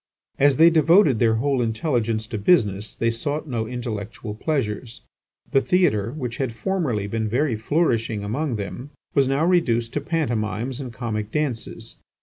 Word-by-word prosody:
As 140 -1 +4
they 165 +1 +7
devoted 160 - +5
their 115 -1 +3
whole 135 +2 +1
intelligence 115 -2 -1
to 110 -1 -5
business, 105 - +2
they 115 0 +1
sought 145 +7 -3
no 115 -5 -2
intellectual 110 -3 -5
pleasures. 115 -3 -3 0.5
The 135 - +4
theatre, 120 - +2
which 125 -5 -5
had 130 -4 -2
formerly 145 - -1
been 110 +1 -2
very 130 +2 +1
flourishing 115 -4 0
among 125 +6 -2
them, 110 +6 -6 0.2
was 140 -2 +3
now 135 +4 +1
reduced 120 -11 +1
to 150 - -1
pantomimes 120 -5 -2
and 130 -3 -6
comic 110 -3 -4
dances. 140 -6 -3
120 Hz, 150 wpm, -23 LUFS, 110-145 Hz, 0.5 s, they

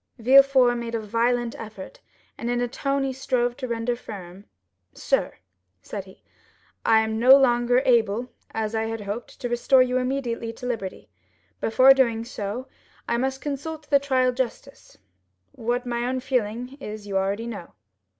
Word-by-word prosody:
Villefort 260 0 +5
made 235 -1 -4
a - - 0
violent 230 +2 0
effort, 215 - -9 0.4
and 235 - -4
in 245 0 0
a 245 - 0
tone 275 +3 -1
he 270 -1 -2
strove 250 -2 0
to 260 -2 -4
render 235 +1 -1
firm: 195 -4 -10 0.5
"Sir," - - 0 0.5
said 200 -2 -6
he, 190 - -17 0.6
"I 220 -1 +5
am 220 0 -2
no 260 +3 +8
longer 245 -1 +3
able, 235 -1 +2 0.2
as 220 -1 -3
I 220 0 0
had 225 -1 -4
hoped, 205 +4 -6
to 245 - -3
restore 250 +2 +4
you 250 0 0
immediately 250 -3 -2
to 250 - -10
liberty; 225 -6 -5 0.5
before 260 +4 +6
doing 230 -4 +1
so, 235 +2 -5 0.4
I 235 - +1
must 265 +1 -2
consult 295 +2 -5
the 280 - +6
trial 260 -2 +2
justice; 250 -1 -5 0.5
what 245 - -2
my 240 -1 -2
own 260 +1 -1
feeling 250 0 -2
is 215 -5 -7
you 200 -1 -5
already 200 +4 -1
know." 210 -7 -7
240 Hz, 160 wpm, -24 LUFS, 225-260 Hz, 0.6 s, no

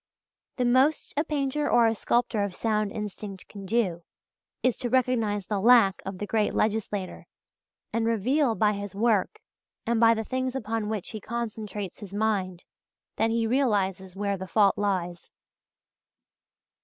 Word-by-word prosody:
The 250 - +1
most 260 +5 +2
a 295 - +2
painter 290 -1 -1
or 235 - +5
a 225 - +3
sculptor 230 0 0
of 200 -2 -2
sound 215 -2 0
instinct 205 -2 -6
can 200 -2 -9
do, 190 -6 0 0.6
is 255 -2 +3
to 245 - -3
recognize 230 -5 +1
the 205 -2 -1
lack 225 -3 +5
of 195 -1 -5
the 205 - -4
great 210 0 0
legislator, 210 -3 -2 0.7
and 230 0 +1
reveal 235 +3 +2
by 210 -1 +2
his 200 -1 -6
work 215 -2 +1 0.5
and 235 0 +1
by 230 0 +6
the 220 - -2
things 255 +2 -2
upon 220 -3 -2
which 215 -4 -3
he 215 -2 -6
concentrates 215 -4 -5
his 200 -2 -9
mind, 195 -5 -1 0.5
that 225 - +2
he 230 0 +1
realizes 200 -7 0
where 200 0 -1
the 190 0 -7
fault 200 0 +3
lies. 180 -4 -2
215 Hz, 155 wpm, -27 LUFS, 200-235 Hz, 0.7 s, by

